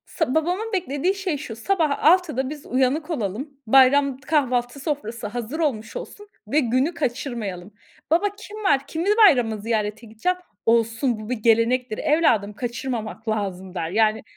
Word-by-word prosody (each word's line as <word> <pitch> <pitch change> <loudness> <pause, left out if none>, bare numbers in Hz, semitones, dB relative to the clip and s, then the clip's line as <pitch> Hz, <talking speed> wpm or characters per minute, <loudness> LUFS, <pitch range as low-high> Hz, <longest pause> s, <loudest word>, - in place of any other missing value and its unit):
Sa 315 -6 -2
babamın 360 +8 0
beklediği 360 -1 0
şey 390 -6 -2
şu, 240 -6 -7
sabah 315 +2 0
06.00'da 310 -6 +3
biz 295 -1 -9
uyanık 265 +6 0
olalım, 230 - -3 0.2
bayram 270 +2 +5
kahvaltı 270 -3 0
sofrası 240 -7 -4
hazır 240 +6 -5
olmuş 225 -8 -2
olsun 415 0 -8 0.2
ve 305 - +3
günü 255 +7 +1
kaçırmayalım. 235 - -4 0.4
Baba, 345 +6 +3
kim 420 0 -10
var, 280 -8 +4
kimi 330 +4 -3 0.2
bayramda 240 - +3
ziyarete 215 +1 -2
gideceğim? 225 +13 -1 0.3
"Olsun, 230 +1 +2
bu 215 - -8
bir 250 - +1
gelenektir 230 +1 +2
evladım, 240 -10 +2
kaçırmamak 235 -1 -5
lazım." 190 -4 -3
der. 170 -2 -3
Yani 220 +1 +2
255 Hz, 145 wpm, -23 LUFS, 220-305 Hz, 0.4 s, bayram